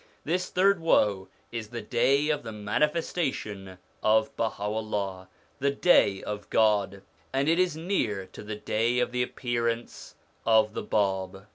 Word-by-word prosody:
This 180 +4 -1
third 195 0 +3
woe 105 -12 +2 0.2
is 115 -2 -5
the 115 0 -6
day 135 +6 +2
of 150 -1 +1
the 115 - -7
manifestation 105 - -2 0.2
of 110 0 +2
Baha'ullah, 105 -3 -3 0.3
the 140 - +2
day 140 - +3
of 105 -1 -6
God; 100 -3 +2 0.3
and 135 +2 0
it 165 +2 +3
is 180 -4 +1
near 125 - -1
to - - -9
the 105 0 -5
day 110 +3 0
of 125 - +1
the 125 0 0
appearance 120 -1 -3 0.3
of 110 -1 +4
the - - -3
Bab. 95 -2 -1
110 Hz, 145 wpm, -27 LUFS, 105-140 Hz, 0.3 s, of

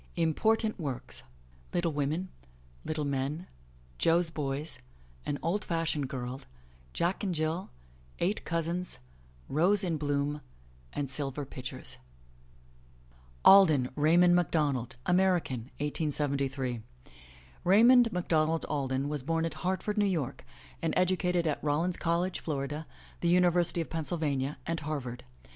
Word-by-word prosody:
Important 215 +7 +1
Works: 140 -6 -4 0.5
Little 175 -1 +1
Women 150 +5 -1 0.5
Little 155 -1 -2
Men 140 +5 -2 0.5
Jo's 165 0 +3
Boys 145 0 -3 0.5
An 145 - -1
Old 190 +6 0
fashioned 165 -5 -1
Girl 125 0 -5 0.5
Jack 175 - -1
and 185 -4 -1
Jill 160 +3 -1 0.5
Eight 195 +5 0
Cousins 170 +2 -2 0.5
Rose 185 +7 +3
In 170 -4 0
Bloom 145 0 -1 0.6
Silver 140 +1 -3
Pitchers 130 -1 -2 1.5
ALDEN, 155 -10 +7
RAYMOND 170 +4 +5
MacDONALD 145 -8 +1
(American, 180 -8 +2 0.2
1873 140 -4 -1 0.4
) 65 0 -23
Raymond 230 +5 +6
MacDonald 165 -2 +1
Alden 135 -1 -1
was 145 -1 -2
bom 165 +4 0
at 165 - -3
Hartford, 190 +3 -1
New 205 - +4
York, 155 -9 -2 0.4
and 165 - 0
educated 180 -1 +2
at 155 -2 -1
Rollins 160 +4 +1
College, 175 +2 0
Florida, 145 +1 -3 0.3
the 170 - +1
University 175 -1 +3
of 165 - -6
Penn 160 -1 -2
sylvania, 145 -5 -1
and 165 0 -1
Harvard. 140 -5 -5
160 Hz, 115 wpm, -30 LUFS, 140-175 Hz, 1.5 s, ALDEN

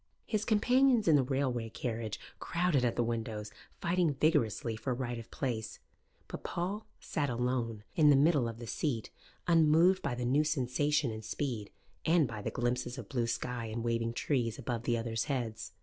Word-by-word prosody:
His 215 -1 -1
companions 245 +1 +4
in 160 - +7
the 140 - +5
railway 130 -3 -1
carriage 110 -2 -4 0.2
crowded 170 -6 +1
at 120 - +1
the 120 - +2
windows, 110 -2 -3 0.3
fighting 170 -3 +2
vigorously 130 - +1
for 125 +3 -2
right 120 -2 -3
of 115 - -10
place; 115 -5 -3 0.5
but - - -7
Paul 195 +5 -3
sat 145 -3 -2
alone 120 -3 -1
in 155 -2 +6
the 145 - +7
middle 145 -3 +4
of 115 -1 -5
the 120 - -7
seat, 115 -1 -2 0.4
unmoved 165 +2 +5
by 120 - -1
the 125 0 -3
new 140 +5 +3
sensation 145 -1 +1
and 110 0 -6
speed, 110 -2 -3 0.3
and 160 -3 +4
by 110 -3 -6
the - - -2
glimpses 120 +1 -1
of 120 -5 -8
blue 120 -3 0
sky 120 0 -2
and 110 +1 -4
waving 115 0 0
trees 120 -3 0
above 120 -3 -3
the 120 - +2
others' 115 -1 -2
heads. 120 -6 -3
125 Hz, 180 wpm, -32 LUFS, 115-150 Hz, 0.5 s, in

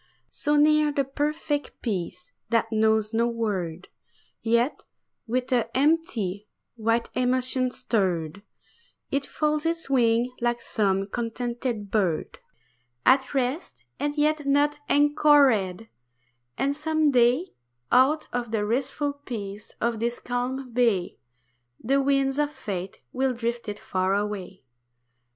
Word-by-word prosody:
So 295 0 0
near 300 0 +4
the 285 -1 +1
perfect 290 +2 -2
peace 180 -4 -4 0.2
that 230 -1 +1
knows 220 0 +2
no 230 +1 +2
word; 190 -7 -3 0.5
Yet 235 +4 +1 0.4
with 250 +3 -1
an 240 -2 +3
empty, 245 - +1 0.3
white 230 +1 0
emotion 255 0 +1
stirred, 185 -7 -1 0.7
It 275 0 -1
folds 305 0 0
its 330 -3 -2
wings 235 -1 +3
like 240 0 +1
some 195 -4 0
contented 235 -1 -3
bird. 185 -7 0 0.7
At 265 +1 +4
rest, 270 +6 -2 0.2
and 290 +1 -2
yet 300 -1 +1
not 290 +1 +2
anchored; 280 -9 +4 0.7
and 280 +1 0
some 310 0 +1
day 250 +7 +3 0.4
Out 275 +5 +4
of 245 -1 -2
the 215 -2 0
restful 270 +5 -1
peace 215 -8 -7
of 235 -1 0
this 235 +1 -1
calm 250 +1 -3
bay 225 -7 +1 0.6
The 275 +4 +1
winds 275 0 +1
of 295 -1 +2
Fate 190 -9 -6
will 265 0 +1
drift 235 -1 -3
it 205 - -5
far 185 +1 0
away. 205 -2 -4
245 Hz, 120 wpm, -26 LUFS, 215-280 Hz, 0.7 s, near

